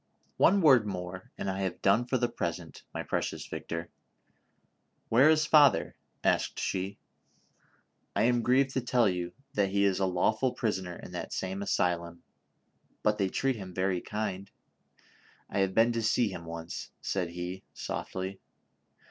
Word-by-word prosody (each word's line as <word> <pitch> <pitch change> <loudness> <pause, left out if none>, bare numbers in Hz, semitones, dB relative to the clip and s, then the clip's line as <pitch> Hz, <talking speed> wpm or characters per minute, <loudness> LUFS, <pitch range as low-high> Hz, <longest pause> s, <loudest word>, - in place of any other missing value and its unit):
One 195 +3 +5
word 130 -9 +6
more, 90 -1 -6
and - - -4
I 95 0 -2
have 95 -2 -2
done 100 +5 +4
for 130 - +1
the 120 0 +1
present, 85 -9 -4
my - - -4
precious - - -2
Victor. 85 0 -5 1.2
AVhere 130 +7 +7
is 155 -1 +3
father 150 -2 +5 0.3
V" - - 0
asked - - 0
she. 95 +1 -2 0.6
" - - -39
I 100 - +3
am 120 0 +3
grieved 130 +3 +3
to 130 - -1
tell 120 -1 +3
you 90 -2 -2 0.2
that 100 -2 +2
he 100 +1 +2
is 95 -1 +2
a 95 - +2
lawful 110 +7 +1
prisoner 95 -5 -2
in - - -10
that - - -5
same 95 +1 -3
asylum, 85 -3 -1 0.8
but 105 0 +2
they 95 -1 +2
treat 135 +4 0
him 95 -3 -8
very 95 -1 0
kindly; 100 -2 -4 1.0
I - - -2
have 95 -1 +1
been 115 +1 +5
to 115 0 -1
see 115 +1 +2
him 85 -3 -7
once," 85 0 -6
said 90 -3 -1
he, 90 +2 -5
softly. 95 +1 -4
100 Hz, 165 wpm, -30 LUFS, 90-120 Hz, 1.2 s, AVhere